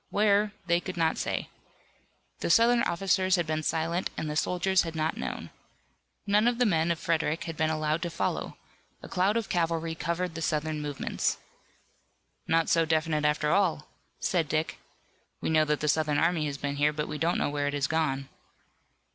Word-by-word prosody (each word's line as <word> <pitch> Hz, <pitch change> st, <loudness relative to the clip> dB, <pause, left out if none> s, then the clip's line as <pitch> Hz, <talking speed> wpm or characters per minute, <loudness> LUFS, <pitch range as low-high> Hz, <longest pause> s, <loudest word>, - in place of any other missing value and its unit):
Where! 205 Hz, 0 st, +3 dB
They 170 Hz, -1 st, +3 dB
could 180 Hz, 0 st, -7 dB
not 160 Hz, -1 st, +1 dB
say. -, -, -2 dB, 0.9 s
The -, -, -2 dB
Southern 235 Hz, +6 st, +5 dB
officers 190 Hz, 0 st, +2 dB
had 175 Hz, -2 st, 0 dB
been 155 Hz, 0 st, -1 dB
silent 165 Hz, +3 st, -1 dB
and 155 Hz, -, -3 dB
the 150 Hz, -, -3 dB
soldiers 180 Hz, +4 st, +2 dB
had 165 Hz, -1 st, -5 dB
not 155 Hz, 0 st, 0 dB
known. -, -, -5 dB, 0.7 s
None 210 Hz, +2 st, +3 dB
of 240 Hz, -1 st, +2 dB
the 245 Hz, -, +3 dB
people 165 Hz, -5 st, +2 dB
of 170 Hz, -, 0 dB
Frederick 160 Hz, -1 st, 0 dB
had 165 Hz, -1 st, -5 dB
been 155 Hz, 0 st, +1 dB
allowed 155 Hz, 0 st, 0 dB
to 175 Hz, -, -2 dB
follow. -, -, -3 dB, 0.5 s
A -, -, -7 dB
cloud 195 Hz, +4 st, +1 dB
of 230 Hz, -, -2 dB
cavalry 165 Hz, -1 st, 0 dB
covered 170 Hz, +2 st, -2 dB
the 165 Hz, -, -6 dB
Southern 155 Hz, -1 st, -1 dB
movements. 145 Hz, -2 st, -2 dB, 1.1 s
"Not 165 Hz, 0 st, +2 dB
so 165 Hz, -, +3 dB
definite 155 Hz, -1 st, +1 dB
after 150 Hz, 0 st, +1 dB
all," 170 Hz, -6 st, +1 dB, 0.3 s
said 165 Hz, -5 st, 0 dB
Dick. 155 Hz, +1 st, -1 dB, 0.6 s
"We -, -, -2 dB
know 155 Hz, -1 st, +4 dB
that 150 Hz, -1 st, 0 dB
the 150 Hz, -, 0 dB
Southern 150 Hz, -1 st, +2 dB
army 165 Hz, -2 st, +2 dB
has 140 Hz, -1 st, -4 dB
been 140 Hz, 0 st, -3 dB
here, 150 Hz, +1 st, +3 dB
but 150 Hz, 0 st, -3 dB
we 150 Hz, -, -5 dB
don't 170 Hz, +2 st, +1 dB
know -, -, 0 dB
where 145 Hz, -1 st, -1 dB
it 145 Hz, -, -1 dB
has 140 Hz, -1 st, +1 dB
gone." 140 Hz, -3 st, 0 dB
160 Hz, 190 wpm, -28 LUFS, 155-180 Hz, 1.1 s, Southern